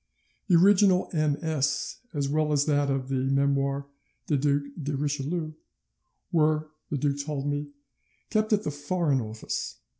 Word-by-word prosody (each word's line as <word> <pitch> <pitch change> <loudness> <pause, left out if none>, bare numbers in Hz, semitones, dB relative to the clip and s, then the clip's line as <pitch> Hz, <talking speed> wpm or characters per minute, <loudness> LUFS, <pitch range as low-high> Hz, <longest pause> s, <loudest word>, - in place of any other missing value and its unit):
The 180 - +5
original 190 +1 +5
MS., 150 -1 0
as 145 -4 -1
well 150 +1 +1
as 145 -1 +3
that 145 -2 +2
of 135 -1 -1
the 130 -1 0
Memoires 140 0 +1 0.4
du 150 - +1
Duc 140 +1 +2 0.2
de 145 0 -2
Richelieu, 150 +3 -2 0.8
were, 155 -1 +2 0.2
the 145 - -1
duke 140 0 0
told 145 -2 -3
me, 145 0 -1 0.6
kept 215 0 +1
at 210 -1 +3
the 150 - -2
Foreign 145 -1 0
Office. 110 0 -5
145 Hz, 145 wpm, -27 LUFS, 140-155 Hz, 0.8 s, The